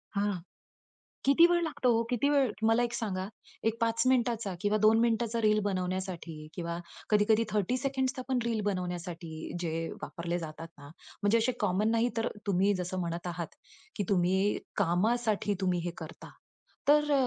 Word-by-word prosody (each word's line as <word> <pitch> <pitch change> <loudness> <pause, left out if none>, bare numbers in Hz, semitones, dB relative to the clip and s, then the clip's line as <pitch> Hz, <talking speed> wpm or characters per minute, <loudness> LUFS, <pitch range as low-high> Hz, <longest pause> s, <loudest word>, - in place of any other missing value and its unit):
हां. 205 0 +1 0.9
किती 280 +5 +7
वेळ 345 0 +3
लागतो 295 -6 0
हो? 230 +1 +2
किती 250 +3 +2
वेळ 275 -5 +3 0.2
मला 230 +2 +4
एक 240 0 -2
सांगा, 190 -5 -2 0.4
एक 225 - -6
5 230 0 +2
मिनिटाचा 235 -6 +1
किंवा 210 +1 +2
2 220 +1 +6
मिनिटाचा 230 0 +1
रील 215 -1 +4
बनवण्यासाठी 185 -2 -3 0.2
किंवा 170 -1 -4 0.3
कधी-कधी 215 +1 +4
30 210 +4 +1
सेकंड्स 265 0 -1
आपण 255 0 -1
रील 230 -2 0
बनवण्यासाठी 175 -4 -4
जे 165 -2 -2 0.3
वापरले 170 +1 -3
जातात 160 0 -7
ना, 145 0 -12 0.3
म्हणजे 205 +3 +4
असे 230 +3 +2
कॉमन 210 +1 +2
नाही 230 +1 +2
तर, 225 - +1 0.2
तुम्ही 195 +1 +3
जसं 185 +1 -3
म्हणत 170 0 -3
आहात, 170 -2 -5 0.4
की 205 - -1
तुम्ही 190 +2 +2 0.2
कामासाठी 210 +4 +1
तुम्ही 180 -2 +1
हे 175 - -1
करता. 160 0 -9 0.6
तर 295 0 +5
210 Hz, 155 wpm, -30 LUFS, 180-235 Hz, 0.9 s, किती